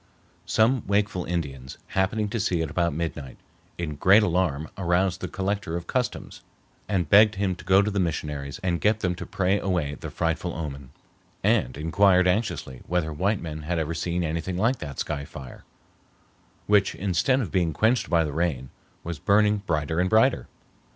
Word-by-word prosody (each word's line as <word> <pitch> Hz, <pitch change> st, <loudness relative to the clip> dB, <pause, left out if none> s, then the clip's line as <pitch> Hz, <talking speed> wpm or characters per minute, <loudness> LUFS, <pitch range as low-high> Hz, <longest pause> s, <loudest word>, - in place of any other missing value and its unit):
Some 115 Hz, +3 st, +3 dB
wakeful 100 Hz, -2 st, 0 dB
Indians, 70 Hz, -7 st, -4 dB
happening 100 Hz, +3 st, 0 dB
to 115 Hz, -, -2 dB
see 90 Hz, -4 st, 0 dB
it 80 Hz, -3 st, -3 dB
about 85 Hz, +1 st, +1 dB
midnight, 75 Hz, -4 st, -5 dB, 0.4 s
in 75 Hz, -4 st, -4 dB
great 100 Hz, +7 st, +6 dB
alarm 85 Hz, -5 st, 0 dB
aroused 90 Hz, 0 st, 0 dB
the -, -, -3 dB
Collector 95 Hz, -3 st, -2 dB
of 85 Hz, -, -7 dB
Customs 125 Hz, +6 st, -3 dB, 0.5 s
and 95 Hz, -6 st, 0 dB
begged 105 Hz, +4 st, +6 dB
him 95 Hz, -1 st, 0 dB
to 90 Hz, -, -11 dB
go 95 Hz, +2 st, +4 dB
to 105 Hz, -, -1 dB
the 100 Hz, -, -1 dB
missionaries 75 Hz, -5 st, -3 dB
and 85 Hz, -2 st, 0 dB
get 110 Hz, +1 st, +2 dB
them 90 Hz, -1 st, 0 dB
to 85 Hz, -, -8 dB
pray 95 Hz, +2 st, +1 dB
away 85 Hz, -8 st, -1 dB
the 75 Hz, -, -7 dB
frightful 85 Hz, +1 st, -2 dB
omen, 70 Hz, -4 st, -6 dB, 0.5 s
and 65 Hz, +3 st, +1 dB
inquired 90 Hz, +4 st, +3 dB
anxiously 90 Hz, -, -1 dB
whether 85 Hz, -3 st, -1 dB
white 95 Hz, +6 st, 0 dB
men 80 Hz, -2 st, -6 dB
had 85 Hz, +3 st, -2 dB
ever 80 Hz, 0 st, -1 dB
seen 85 Hz, +1 st, -2 dB
anything 85 Hz, +3 st, -3 dB
like 115 Hz, +6 st, +1 dB
that 70 Hz, -4 st, -7 dB
sky 70 Hz, -1 st, -3 dB
fire, 70 Hz, -3 st, -11 dB, 1.0 s
which 100 Hz, -2 st, +3 dB
instead 100 Hz, +8 st, +1 dB
of 105 Hz, -, -3 dB
being 85 Hz, -3 st, +1 dB
quenched 110 Hz, -, +1 dB
by 85 Hz, -2 st, +3 dB
the 75 Hz, -2 st, -4 dB
rain 75 Hz, -6 st, -2 dB, 0.3 s
was 85 Hz, -2 st, -5 dB
burning 105 Hz, +4 st, +3 dB
brighter 80 Hz, 0 st, 0 dB
and 90 Hz, +1 st, +2 dB
brighter. 110 Hz, -, +3 dB
90 Hz, 175 wpm, -25 LUFS, 80-100 Hz, 1.0 s, great